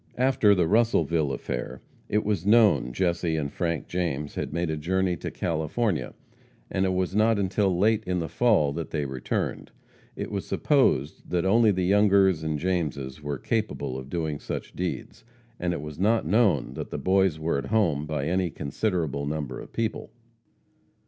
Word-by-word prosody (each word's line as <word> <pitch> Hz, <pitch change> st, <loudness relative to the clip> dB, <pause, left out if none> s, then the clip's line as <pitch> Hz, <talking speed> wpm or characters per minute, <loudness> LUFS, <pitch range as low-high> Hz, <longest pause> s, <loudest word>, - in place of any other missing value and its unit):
After 125 Hz, -5 st, +4 dB
the 90 Hz, -3 st, +2 dB
Russellville 85 Hz, -8 st, +2 dB
affair, -, -, -4 dB, 0.3 s
it 105 Hz, -, +1 dB
was 105 Hz, -5 st, 0 dB
known 105 Hz, -, +4 dB
Jesse 85 Hz, +4 st, 0 dB
and 70 Hz, -3 st, -3 dB
Frank 85 Hz, -3 st, -2 dB
James 80 Hz, -5 st, -2 dB
had -, -, -4 dB
made 85 Hz, +1 st, -1 dB
a -, -, -1 dB
journey 90 Hz, +4 st, 0 dB
to -, -, -5 dB
California, 80 Hz, -, -2 dB, 0.6 s
and 95 Hz, -, +1 dB
it 95 Hz, -, 0 dB
was 90 Hz, 0 st, -1 dB
not 110 Hz, +1 st, +3 dB
until 95 Hz, -1 st, +1 dB
late 110 Hz, +3 st, +2 dB
in 90 Hz, 0 st, 0 dB
the 85 Hz, -2 st, -2 dB
fall 95 Hz, -8 st, +2 dB
that 80 Hz, +1 st, -5 dB
they 75 Hz, -3 st, -2 dB
returned. 65 Hz, -2 st, -3 dB, 0.5 s
It -, -, -5 dB
was 100 Hz, -2 st, -4 dB
supposed 130 Hz, -, +1 dB
that 90 Hz, 0 st, 0 dB
only 110 Hz, +3 st, +5 dB
the 95 Hz, -3 st, +1 dB
Youngers 100 Hz, -3 st, +4 dB
and 80 Hz, -1 st, -2 dB
Jameses 75 Hz, -6 st, -2 dB
were 75 Hz, -1 st, -3 dB
capable 105 Hz, -, -2 dB
of 65 Hz, 0 st, -7 dB
doing 80 Hz, -2 st, -2 dB
such -, -, -6 dB
deeds, -, -, -4 dB, 0.4 s
and 90 Hz, 0 st, 0 dB
it 85 Hz, -, -3 dB
was 75 Hz, +1 st, -8 dB
not 110 Hz, +2 st, +2 dB
known 95 Hz, -, +2 dB
that -, -, -6 dB
the -, -, -4 dB
Boys 95 Hz, -3 st, +2 dB
were 80 Hz, -2 st, 0 dB
at -, -, -5 dB
home 85 Hz, -10 st, +1 dB
by 75 Hz, -2 st, -2 dB
any 90 Hz, +2 st, 0 dB
considerable 75 Hz, -3 st, -2 dB
number 75 Hz, -2 st, -4 dB
of -, -, -10 dB
people. 115 Hz, -3 st, -3 dB
90 Hz, 175 wpm, -26 LUFS, 75-100 Hz, 0.6 s, only